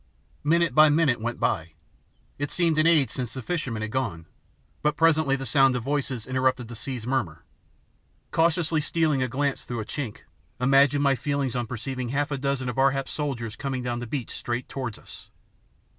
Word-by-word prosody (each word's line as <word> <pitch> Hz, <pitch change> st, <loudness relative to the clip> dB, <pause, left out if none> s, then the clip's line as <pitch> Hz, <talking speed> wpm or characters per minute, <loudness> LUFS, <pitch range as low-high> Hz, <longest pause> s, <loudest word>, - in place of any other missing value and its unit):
Minute 165 Hz, -1 st, +3 dB
by 155 Hz, +2 st, +7 dB
minute 145 Hz, -6 st, +2 dB
went 120 Hz, +1 st, -3 dB
by. 80 Hz, -1 st, -1 dB, 0.7 s
It 145 Hz, 0 st, -2 dB
seemed 165 Hz, -3 st, +2 dB
an 155 Hz, -, +4 dB
age 155 Hz, -5 st, +4 dB
since 125 Hz, -2 st, -3 dB
the 130 Hz, -, -4 dB
fisherman 125 Hz, -9 st, -2 dB
had 110 Hz, -, -4 dB
gone, 100 Hz, -11 st, -2 dB, 0.6 s
but 150 Hz, 0 st, +1 dB
presently 160 Hz, -4 st, +4 dB
the 135 Hz, -1 st, -5 dB
sound 135 Hz, -2 st, +4 dB
of 125 Hz, -, -2 dB
voices 135 Hz, -4 st, -2 dB
interrupted 130 Hz, -2 st, 0 dB
the 120 Hz, -, -7 dB
sea's 125 Hz, -1 st, -5 dB
murmur. 120 Hz, -12 st, -2 dB, 0.9 s
Cautiously 165 Hz, -1 st, +2 dB
stealing 155 Hz, -3 st, +1 dB
a 130 Hz, -, +1 dB
glance 140 Hz, +2 st, -1 dB
through 120 Hz, -2 st, -4 dB
a -, -, -6 dB
chink 115 Hz, 0 st, -5 dB, 0.4 s
imagine 135 Hz, +2 st, +4 dB
my 140 Hz, -1 st, +4 dB
feelings 140 Hz, -2 st, -1 dB
on 120 Hz, -2 st, -1 dB
perceiving 125 Hz, +1 st, -4 dB
half 145 Hz, +3 st, -1 dB
a 140 Hz, -, -2 dB
dozen 140 Hz, -1 st, -1 dB
of 125 Hz, +1 st, -3 dB
Ar 135 Hz, +1 st, +6 dB
hap's 135 Hz, 0 st, -3 dB
soldiers 120 Hz, -7 st, -3 dB
coming 135 Hz, -2 st, -3 dB
down 120 Hz, -1 st, -2 dB
the 120 Hz, -, -5 dB
beach 130 Hz, 0 st, -4 dB
straight 120 Hz, +1 st, -3 dB
towards 130 Hz, -5 st, -5 dB
us! -, -, -13 dB
135 Hz, 190 wpm, -26 LUFS, 120-145 Hz, 0.9 s, by